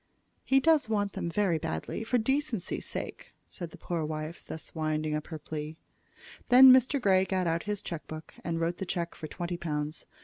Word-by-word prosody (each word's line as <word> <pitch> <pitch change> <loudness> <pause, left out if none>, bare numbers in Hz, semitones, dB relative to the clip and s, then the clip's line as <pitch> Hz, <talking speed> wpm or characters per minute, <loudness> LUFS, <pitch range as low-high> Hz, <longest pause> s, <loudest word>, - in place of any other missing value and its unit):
"He 270 - +4
does 310 -4 +3
want 205 -2 0
them 170 - -3
very 175 -3 +1
badly 165 +7 -3
for 245 +2 +1
decency's 255 - -1
sake," - - -6
said 175 -4 -7
the - - -13
poor 170 -2 -3
wife, 155 +1 -5
thus 160 - -6
winding 155 -1 -1
up 150 0 -3
her 160 - -5
plea. 155 +1 -6 0.7
Then 260 +1 +10
Mr. 260 +2 +4
Grey 190 -5 +4
got 190 -1 0
out 165 0 +1
his 205 -1 -2
check 165 -2 -6
book 155 0 -8
and 165 -1 -2
wrote 170 +1 0
the 190 - -4
check 170 -2 -2
for 155 - -7
twenty 175 +3 -4
pounds. 150 -2 -3
170 Hz, 195 wpm, -29 LUFS, 155-210 Hz, 0.7 s, Then